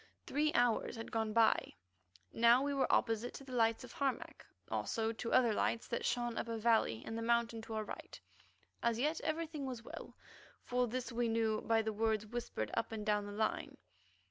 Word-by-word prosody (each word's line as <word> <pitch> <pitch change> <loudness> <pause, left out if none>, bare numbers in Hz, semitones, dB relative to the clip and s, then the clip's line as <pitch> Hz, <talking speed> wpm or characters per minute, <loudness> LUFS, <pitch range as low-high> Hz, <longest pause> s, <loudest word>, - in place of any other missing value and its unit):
Three 300 +1 +1
hours 240 0 +2
had 225 0 -7
gone 220 -1 0
by. 225 - +3 0.6
Now 235 +3 +6
we 285 0 0
were 270 -2 +1
opposite 225 +1 +1
to - - -8
the 265 - -11
lights 230 0 +2
of 250 - -10
Harmac, 275 -2 -2 0.3
also 225 -1 0
to 230 +1 -5
other 245 -3 +5
lights 230 +2 0
that 235 - -2
shone 240 -2 0
up - - -3
a 230 0 -2
valley 220 - +2
in 225 - -4
the 230 - -3
mountain 235 -1 +1
to 225 0 -6
our 215 - -1
right. - - -8 0.6
As 235 -1 +1
yet 300 +6 0
everything 315 -3 -2
was 245 -3 -5
well; - - -9 0.5
for 250 0 +1
this 250 +2 -3
we 235 0 0
knew 225 -1 +1
by 225 -1 +2
the 220 0 -2
words 220 0 +1
whispered 215 - -4
up 230 - -1
and 215 -2 -4
down 210 -1 +1
the - - -6
line. 215 +2 -1
230 Hz, 195 wpm, -36 LUFS, 220-245 Hz, 0.6 s, Now